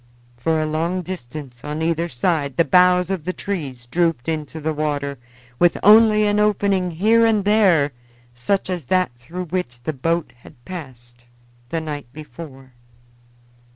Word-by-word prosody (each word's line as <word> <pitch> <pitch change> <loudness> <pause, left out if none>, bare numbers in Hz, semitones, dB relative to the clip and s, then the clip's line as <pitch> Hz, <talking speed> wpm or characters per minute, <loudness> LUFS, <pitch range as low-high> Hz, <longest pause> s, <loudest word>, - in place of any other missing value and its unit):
For 160 +7 0
a 155 - 0
long 165 +4 -1
distance 140 -7 -8
on 150 +2 -3
either 165 +1 0
side 140 0 -1
the 170 - +4
boughs 180 0 +4
of 185 -5 -2
the 185 +3 -3
trees 140 -14 -5
drooped 165 -1 0
into 155 -1 -3
the 160 +1 -2
water, 145 -3 -2 0.4
with 175 -1 +4
only 215 +1 +7
an 205 0 +2
opening 200 -3 +2
here 215 +7 +3
and 215 -3 +2
there 190 -9 +4 0.4
such 125 +12 -1
as 180 -6 -4
that 185 +3 +1
through 165 +10 -7
which 155 -9 -4
the 155 - -2
boat 165 0 -1
had 120 0 -18
passed 120 -9 -10 0.4
the 165 - -2
night 145 -4 -6
before. 135 -3 -11
160 Hz, 155 wpm, -21 LUFS, 140-185 Hz, 0.4 s, only